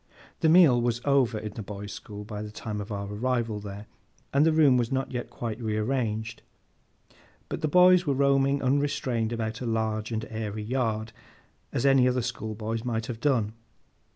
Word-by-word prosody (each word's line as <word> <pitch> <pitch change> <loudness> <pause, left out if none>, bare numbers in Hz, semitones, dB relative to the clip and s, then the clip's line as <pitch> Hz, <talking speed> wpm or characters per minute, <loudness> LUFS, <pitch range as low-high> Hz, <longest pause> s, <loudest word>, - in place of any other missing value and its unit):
The 160 - +3
meal 155 -8 +6
was 120 0 0
over, 135 -5 +3
in 105 -1 -6
the 110 - -6
boys' 100 0 -7
school, 105 -1 -8
by 105 0 -6
the 105 - -6
time 105 0 -5
of 105 - -8
our 100 -1 -3
arrival 115 0 -1
there, 100 0 -8 0.5
and 140 +2 +5
the 160 - +4
room 155 -4 +5
was 120 -2 +1
not 135 0 -1
yet 125 -2 -4
quite 115 0 -5
rearranged; 110 0 -2 1.1
but - - -4
the 155 - +1
boys 180 +2 +5
were 140 - +2
roaming 140 0 +2
unrestrained 130 -4 0
about 110 -1 -3
a 125 - -3
large 110 -1 -1
and 110 0 -2
airy 110 -1 -4
yard, 110 -2 -2 0.6
as 125 - -1
any 135 -2 +5
other 125 -1 +1
schoolboys 110 -2 -4
might 115 -2 -2
have 115 -2 -6
done. 115 -7 +1
115 Hz, 180 wpm, -27 LUFS, 110-135 Hz, 1.1 s, meal